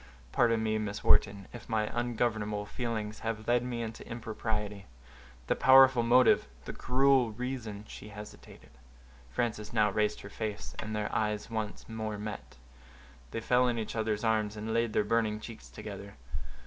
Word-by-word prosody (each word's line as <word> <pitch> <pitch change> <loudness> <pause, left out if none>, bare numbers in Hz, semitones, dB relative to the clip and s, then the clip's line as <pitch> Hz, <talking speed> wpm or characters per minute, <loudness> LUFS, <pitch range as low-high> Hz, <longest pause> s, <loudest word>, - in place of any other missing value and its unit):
"Pardon 115 - +3
me, 110 0 +1
Miss 105 -1 -4
Wharton, 100 -1 +3
if 120 - -10
my 110 -1 +2
ungovernable 110 -3 -1
feelings 110 -1 -3
have 110 -1 -4
led 120 0 +4
me 120 -2 -3
into 110 0 -6
impropriety; 110 -3 -3 0.6
the - - +1
powerful 130 -2 +7
motive—the 115 - +3
cruel 130 -2 +3
reason"—she 110 -4 -6
hesitated. 105 0 -11 0.6
Frances 105 - -2
now 110 -3 +3
raised 105 +1 0
her 100 - -9
face, 105 -1 -4
and 110 0 -3
their 105 0 -2
eyes 105 0 -1
once 110 -2 -4
more 110 -2 -4
met; 100 - -7 0.7
they 115 - -4
fell 125 +2 +3
in 120 -1 0
each 110 0 -3
other's 110 -1 -1
arms, 110 -2 +1
and 110 +1 -3
laid 115 0 +2
their - - +3
burning 110 0 +1
cheeks 115 0 -10
together. 100 -1 -8
110 Hz, 150 wpm, -31 LUFS, 105-115 Hz, 0.7 s, powerful